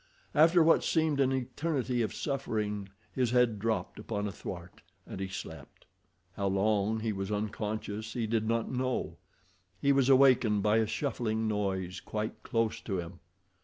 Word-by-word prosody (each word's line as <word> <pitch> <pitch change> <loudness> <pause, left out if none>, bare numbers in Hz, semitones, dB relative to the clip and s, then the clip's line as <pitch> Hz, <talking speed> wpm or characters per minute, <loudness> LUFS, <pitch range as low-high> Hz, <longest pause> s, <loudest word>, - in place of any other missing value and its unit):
After 165 +2 +6
what 165 - +5
seemed 155 -3 +1
an 135 -1 +3
eternity 130 -1 -1
of 110 - 0
suffering 105 -8 -2 0.2
his 125 -3 0
head 120 -3 +3
dropped 110 -4 -2
upon 105 0 -3
a - - -4
thwart, 90 -1 -8 0.2
and - - -7
he 95 - -2
slept. 95 - -9 0.5
How 100 +2 -1
long 105 +2 +1
he 110 0 0
was 95 +1 -4
unconscious 105 +1 -3
he 120 -2 -1
did 110 0 0
not 115 0 0
know—he 100 -4 -3
was 135 -1 +3
awakened 130 -6 +5
by 105 +1 +4
a 110 -1 +2
shuffling 110 -4 -1
noise 95 -3 -2
quite 110 +2 -4
close 115 -1 -1
to 100 -4 -3
him. 85 0 -6
110 Hz, 155 wpm, -30 LUFS, 100-125 Hz, 0.5 s, After